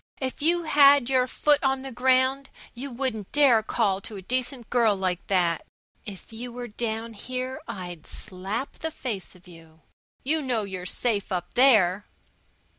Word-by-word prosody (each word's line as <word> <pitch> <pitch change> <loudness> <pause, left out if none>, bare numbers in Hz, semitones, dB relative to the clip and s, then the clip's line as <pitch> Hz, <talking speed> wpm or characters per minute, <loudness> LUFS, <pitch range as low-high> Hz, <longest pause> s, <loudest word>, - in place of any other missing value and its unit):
"If 260 +1 -4
you 340 +3 +2
had 285 -4 +5
your 255 -1 +3
foot 295 +3 +2
on 270 -1 +1
the 270 - -6
ground 260 +2 +2 0.2
you 265 +4 -6
wouldn't 240 -5 -4
dast 250 -7 +4
call 200 -4 +1
to 210 - -5
a 195 - -7
decent 250 +2 -2
girl 230 -4 +3
like 185 -2 -2
that. 175 -4 +1 0.4
If 200 +2 -10
you 240 +2 -6
were 245 0 -6
down 225 +1 -3
here 255 +6 -5
I'd 175 -4 -7
slap 200 +6 -6
the 320 - -2
face 245 - -5
of 180 0 -19
you. 165 -2 -16 0.4
You 310 +4 0
know 245 -6 -1
you're 185 -2 -5
safe 210 -2 -1
up 180 -2 -3
there." 210 -7 +4
235 Hz, 165 wpm, -26 LUFS, 195-265 Hz, 0.4 s, had